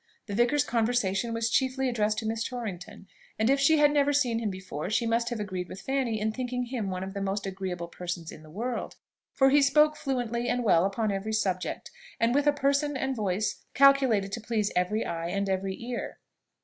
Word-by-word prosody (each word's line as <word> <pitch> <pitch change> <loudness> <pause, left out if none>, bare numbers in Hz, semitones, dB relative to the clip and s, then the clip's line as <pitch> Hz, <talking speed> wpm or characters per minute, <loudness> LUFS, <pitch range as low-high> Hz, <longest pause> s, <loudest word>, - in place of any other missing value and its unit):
The 205 - -6
vicar's 240 +6 +3
conversation 230 -2 0
was 230 0 -1
chiefly 265 +1 +1
addressed 215 -3 0
to 225 - -3
Miss 225 +1 -1
Torrington; 205 -7 -6 0.3
and 220 +4 +3
if 275 - +3
she 310 +3 +5
had 295 -1 +5
never 290 -1 +3
seen 245 -5 +2
him 225 -2 -1
before, 185 -4 -5
she 225 +2 +1
must 230 +1 +1
have 240 -2 -4
agreed 185 -3 -4
with 190 - -8
Fanny 260 -4 -1
in 215 +1 0
thinking 250 +1 -3
him 240 -5 -3
one 185 0 -3
of 190 0 -6
the 200 - -4
most 195 +1 -2
agreeable 185 -3 -4
persons 175 -1 -6
in - - -11
the 155 - -15
world 235 +8 -4 0.4
for 270 0 +5
he 290 +1 +6
spoke 300 +2 +4
fluently 245 -3 -2
and 245 0 0
well 180 -5 +4
upon 205 +2 0
every 200 +3 -3
subject, 190 -4 -2 0.3
and 230 +1 +2
with 285 +2 +2
a - - +7
person 280 0 +1
and 265 0 -1
voice 205 -1 -1
calculated 265 -8 +5
to 230 - -4
please 215 -2 -1
every 180 +5 +1
eye 165 0 -3
and 200 +3 -1
every 190 0 -2
ear. 240 0 -5
225 Hz, 210 wpm, -28 LUFS, 195-255 Hz, 0.4 s, a